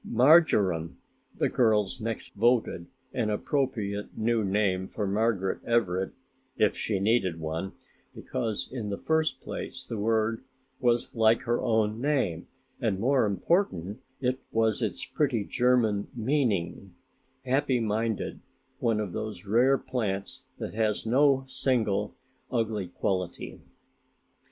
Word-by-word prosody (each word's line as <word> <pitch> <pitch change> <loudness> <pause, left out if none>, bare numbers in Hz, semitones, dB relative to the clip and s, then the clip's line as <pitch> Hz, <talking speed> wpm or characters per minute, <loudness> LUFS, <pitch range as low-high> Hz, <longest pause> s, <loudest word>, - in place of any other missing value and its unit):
"Marjoram" 105 - +4 0.4
the - - +2
girls 110 -1 +2
next 115 0 -4
voted 115 -6 +1 0.3
an 120 -5 0
appropriate 105 -3 -2
new 115 0 +1
name 95 -2 +1
for 105 - -3
Margaret 100 -1 0
Everett 95 -5 +1 0.5
if 105 - +3
she 105 -3 -1
needed 95 -5 +1
one, 80 +4 -4 0.4
because 115 -5 -3
in 115 -5 -4
the 100 - -2
first 160 -1 0
place 130 - -6
the 115 -3 -5
word 110 +1 +1 0.4
was 120 -1 +1
like 115 0 +4
her 120 -1 0
own 110 -2 +1
name 130 - 0 0.3
and 100 -5 0
more 130 +1 +3
important 105 - 0 0.5
was 110 -1 +1
its - - -2
pretty 125 -8 0
German 115 -3 +2
meaning, 110 - -1 0.5
"happy 130 0 +2
minded", 110 0 -1 0.4
one 115 -2 +1
of 100 -5 -3
those 105 -3 -5
rare 125 +7 +4
plants 105 -8 -3
that - - -5
has 110 -1 0
no 135 +3 +4
single 110 -7 0 0.4
ugly 110 -6 -1
quality. 90 0 -3
110 Hz, 120 wpm, -28 LUFS, 100-125 Hz, 0.5 s, Marjoram